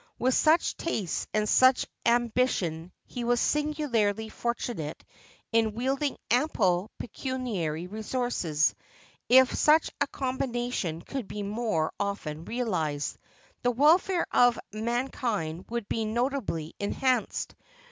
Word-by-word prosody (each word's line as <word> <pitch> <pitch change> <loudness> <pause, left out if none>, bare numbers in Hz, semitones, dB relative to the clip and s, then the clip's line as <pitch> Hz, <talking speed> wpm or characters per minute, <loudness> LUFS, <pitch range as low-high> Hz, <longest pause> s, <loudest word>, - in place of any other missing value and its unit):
With 255 +2 +2
such 320 +5 +3
tastes 220 - -2
and 215 0 +1
such 255 +3 +5 0.2
ambi 240 +1 +3
tion, 165 -3 -3
he 245 - -5
was 240 0 +2
singularly 240 -9 0
fortunate 230 -10 -4 0.5
in 225 -2 +2
wielding 270 +4 -1
ample 210 - +2
pecu 260 +3 -5
niary 175 -10 -2
resources; 215 - 0 0.6
if 260 +1 +7
such 305 +1 +4
a 285 - +3
combination 245 - -2
could 265 -7 -5
be 210 - -5
more 205 -6 -1
often 170 -6 -3
realized, 180 - -2 0.4
the 245 - +2
welfare 325 +8 +4
of 245 -1 +5 0.2
mankind 220 -7 -2
would 235 -3 -3
be 225 - -1
notably 230 - -2
enhanced. 250 +4 0
235 Hz, 115 wpm, -28 LUFS, 195-255 Hz, 0.6 s, if